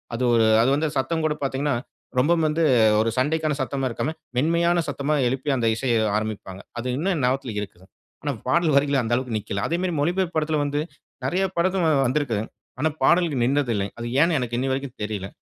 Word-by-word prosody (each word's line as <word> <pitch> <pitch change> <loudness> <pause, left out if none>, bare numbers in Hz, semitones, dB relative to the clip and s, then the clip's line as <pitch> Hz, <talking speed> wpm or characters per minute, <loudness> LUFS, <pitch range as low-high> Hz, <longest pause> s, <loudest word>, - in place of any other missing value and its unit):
அது 125 - -2
ஒரு 115 -1 +4 0.2
அது 120 - +3
வந்து 155 +2 0
சத்தம் 160 +5 0
கூட 155 - +2
பார்த்தீங்கன்னா 135 +1 0 0.4
ரொம்பவும் 160 +4 +3
வந்து 155 +2 0 0.4
ஒரு 110 +1 +2
சண்டைக்கான 155 +3 +1
சத்தமா 135 -1 -2
இருக்காம, 145 +6 -2 0.2
மென்மையான 170 +5 +2
சத்தமா 140 +2 -1
எழுப்பி 130 +3 -2
அந்த 115 -2 +1
இசைய 120 0 0 0.2
ஆரம்பிப்பாங்க. 105 -3 -5 0.2
அது 120 - -4
இன்னும் 185 +6 0
என் 145 - -2
ஞாபகத்தில 130 -2 -1
இருக்குது. 95 -2 -10 0.4
ஆனா 145 - 0 0.2
பாடல் 160 +3 +2
வரிகள் 140 -1 +3
அந்த 115 +1 -1
அளவுக்கு 125 -3 -2
நிக்கல. 100 -1 -4
அதேமாரி 175 +2 -1
மொழிபெயர்ப்பு 175 +2 0
படத்தில 155 0 +1
வந்து 145 +1 -1 0.4
நிறைய 185 +2 +1
படத்துல 180 -1 +2 0.2
வந்திருக்குங்க. 120 -5 -1 0.3
ஆனா 160 +3 +2
பாடலுக்கு 165 -2 +3
நின்னது 135 -1 +1
இல்லங்க. 100 0 -2
அது 120 - -4
ஏன்னு 165 0 +3
எனக்கு 120 -2 -3
இன்னிவரைக்கும் 135 0 -2
தெரியல. 105 -2 -4
140 Hz, 180 wpm, -24 LUFS, 120-160 Hz, 0.4 s, ஒரு